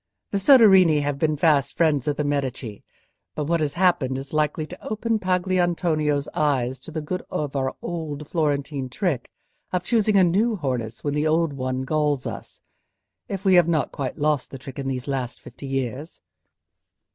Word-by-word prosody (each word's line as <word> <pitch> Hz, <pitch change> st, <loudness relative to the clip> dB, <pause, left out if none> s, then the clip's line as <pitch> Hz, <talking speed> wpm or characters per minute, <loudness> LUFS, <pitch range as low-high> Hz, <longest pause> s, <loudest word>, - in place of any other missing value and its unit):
The 200 Hz, -, 0 dB
Soderini 190 Hz, -, +6 dB
have 145 Hz, -1 st, -2 dB
been 155 Hz, 0 st, +1 dB
fast 145 Hz, -3 st, +2 dB
friends 150 Hz, -6 st, +2 dB
of 145 Hz, -, 0 dB
the 150 Hz, -, 0 dB
Medici, 135 Hz, -6 st, -3 dB, 0.5 s
but 150 Hz, -, -2 dB
what 170 Hz, +2 st, +1 dB
has 150 Hz, -2 st, -1 dB
happened 170 Hz, -8 st, +2 dB
is 135 Hz, +2 st, -7 dB
likely 155 Hz, 0 st, 0 dB
to -, -, -11 dB
open 220 Hz, +1 st, -1 dB
Pagolantonio's 175 Hz, -6 st, +1 dB
eyes 130 Hz, -4 st, 0 dB
to -, -, -12 dB
the 160 Hz, -1 st, -4 dB
good 180 Hz, +4 st, -3 dB
of 145 Hz, -2 st, -3 dB
our 130 Hz, -1 st, -1 dB
old 155 Hz, -4 st, -5 dB
Florentine 145 Hz, -4 st, -1 dB
trick 140 Hz, -, -2 dB, 0.4 s
of 180 Hz, -1 st, -1 dB
choosing 215 Hz, 0 st, +2 dB
a 190 Hz, -, +6 dB
new 210 Hz, +7 st, +2 dB
harness 125 Hz, -, -3 dB
when 145 Hz, -, -1 dB
the 150 Hz, +1 st, +1 dB
old 160 Hz, -1 st, +2 dB
one 130 Hz, -1 st, -2 dB
galls 150 Hz, -1 st, 0 dB
us; -, -, -7 dB, 0.7 s
if 195 Hz, 0 st, -5 dB
we 190 Hz, -, +5 dB
have 175 Hz, -2 st, +6 dB
not 160 Hz, -4 st, 0 dB
quite 135 Hz, -2 st, -4 dB
lost 150 Hz, -3 st, 0 dB
the 135 Hz, -, -8 dB
trick 135 Hz, +1 st, -9 dB
in 135 Hz, -, -3 dB
these 130 Hz, 0 st, -3 dB
last 130 Hz, -3 st, -3 dB
fifty 140 Hz, -, -10 dB
years." 135 Hz, +3 st, -4 dB
150 Hz, 180 wpm, -24 LUFS, 135-175 Hz, 0.7 s, Soderini